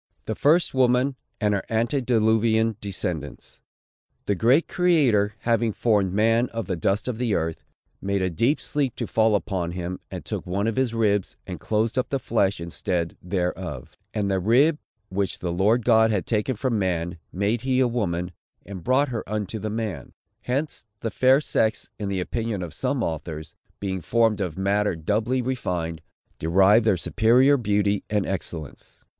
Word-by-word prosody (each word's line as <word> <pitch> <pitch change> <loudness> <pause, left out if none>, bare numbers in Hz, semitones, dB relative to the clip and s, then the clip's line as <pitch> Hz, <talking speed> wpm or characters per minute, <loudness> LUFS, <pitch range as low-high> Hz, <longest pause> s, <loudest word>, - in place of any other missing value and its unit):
THE - - -2
FIRST 160 +4 +3
WOMAN, 130 +1 +3 0.2
AND 105 -2 +2
HER 100 - -1
ANTEDILUVIAN 115 -2 +2
DESCENDANTS. 80 -9 -5 0.7
The 100 - +1
great 125 - +3
Creator, 130 - +2
having 115 -2 +1
formed 105 -5 +2
man 115 +4 +2
of 115 -1 -4
the 95 - -2
dust 95 +7 0
of 120 -3 -3
the 115 -5 +1
earth, 80 0 -2 0.4
"made 100 -1 0
a 90 - 0
deep 120 - +1
sleep 140 -5 -1
to - - -3
fall 110 -1 +2
upon 90 -4 -2
him, 90 0 -4
and - - -7
took - - -4
one 100 +3 -1
of 115 -1 0
his 130 -3 0
ribs, 105 -4 +1
and - - -6
closed 110 +3 0
up 130 - -2
the 135 - 0
flesh 100 -7 0
instead 85 0 -3
thereof. 90 -6 -3 0.2
And 100 -2 -1
the 95 - +1
rib, 135 - +3 0.3
which 95 0 -2
the 90 - -3
Lord 105 +7 +2
God 110 -2 +5
had 105 -4 0
taken 115 +3 0
from 115 -1 -1
man, 85 -2 -1
made 100 +5 0
he 130 0 +1
a 130 - +4
woman, 90 -7 -2 0.3
and 95 -3 -8
brought 130 +3 +2
her 115 -3 -3
unto 105 0 -3
the 110 - -3
man." 110 -4 -4 0.3
Hence 140 +5 -2 0.2
the 115 - -2
fair 130 +5 +4
sex, 110 -6 -1
in 100 -2 -3
the 95 -2 -1
opinion 110 0 -3
of 85 - -7
some - - -1
authors, 80 -1 -5 0.2
being 95 -2 -3
formed 110 +2 +2
of 90 -4 -3
matter 100 0 +1
doubly 110 +10 0
refined, 90 -10 -3 0.4
derive 95 +7 +4
their 105 -5 +3
superior 125 +10 +4
beauty 105 -4 +1
and 105 -2 +1
excellence. 85 -6 -6
105 Hz, 170 wpm, -24 LUFS, 95-120 Hz, 0.7 s, God